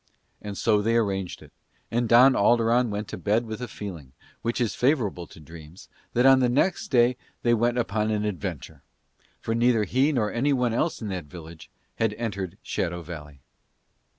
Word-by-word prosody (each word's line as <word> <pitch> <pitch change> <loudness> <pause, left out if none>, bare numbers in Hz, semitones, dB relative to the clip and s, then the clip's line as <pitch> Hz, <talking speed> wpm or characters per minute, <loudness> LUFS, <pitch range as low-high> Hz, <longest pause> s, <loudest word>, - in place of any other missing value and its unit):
And 100 -2 -7
so 105 -2 +2
they 115 +2 +1
arranged 95 -5 -2
it, - - -18 0.4
and 120 0 0
Don 125 +3 +7
Alderon 120 +2 +3
went 105 0 -4
to - - -6
bed 110 +4 +1
with 110 +2 -6
a 125 - -4
feeling, 85 - -8 0.3
which 115 0 -2
is 120 -3 0
favourable 120 - 0
to - - -15
dreams, 80 +2 -13 0.2
that 125 +2 +2
on 135 0 +7
the 125 -1 +2
next 180 - +1
day 125 -3 +3 0.3
they 120 - +3
went 120 +1 +1
upon 110 -2 0
an 105 -1 -1
adventure; 95 -7 -5 0.6
for 115 - -3
neither 115 -1 +3
he 130 +7 +2
nor 110 -7 0
anyone 125 -2 +1
in 120 -3 -1
that 90 -4 -4
village 80 +1 -12 0.3
had 115 -2 +1
entered 100 -5 -4
Shadow 85 -1 -3
Valley. 75 -4 -10
110 Hz, 175 wpm, -25 LUFS, 95-120 Hz, 0.6 s, Don